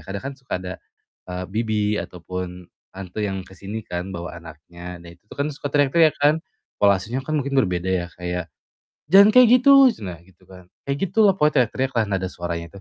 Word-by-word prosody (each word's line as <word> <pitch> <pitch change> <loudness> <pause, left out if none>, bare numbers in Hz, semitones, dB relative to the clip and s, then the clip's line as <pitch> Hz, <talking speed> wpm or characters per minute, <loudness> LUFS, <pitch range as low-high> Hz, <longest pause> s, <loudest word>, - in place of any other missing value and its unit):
kadang 100 +1 -5
kan - - -8
suka 130 - -12
ada, 90 0 -5 0.6
eee, 90 0 -4
bibi 105 -1 0
ataupun 90 0 -7 0.2
tante 95 +2 -7
yang 95 -2 -3
ke 95 - -15
sini 100 +3 -7
kan 90 +2 -5
bawa 85 -2 -6
anaknya, 85 +2 -11
nah 85 0 -13
itu 85 - -30 0.2
kan 140 - 0
suka 145 0 -5
teriak-teriak 150 +3 +4
kan. 150 +3 +3 0.3
Pola 100 -1 +3
asuhnya 120 +8 -4
kan 155 +3 -1
mungkin 140 0 -3
berbeda 90 -8 +1
ya, 90 -2 0
kayak, 90 -2 -4 0.6
“Jangan 195 +6 +7
kayak 250 +1 +7
gitu!" 275 -2 +7
ceunah, 90 -4 -8
gitu 95 -2 -25
kan. 90 -1 -14 0.2
Kayak 140 0 -3
gitu 220 +5 +1
loh, 195 -3 +4
pokoknya 150 -3 +3 0.2
teriak-teriaklah, 130 -4 -1
nada 95 -2 -1
suaranya 85 -2 -5
95 Hz, 185 wpm, -22 LUFS, 90-140 Hz, 0.6 s, Jangan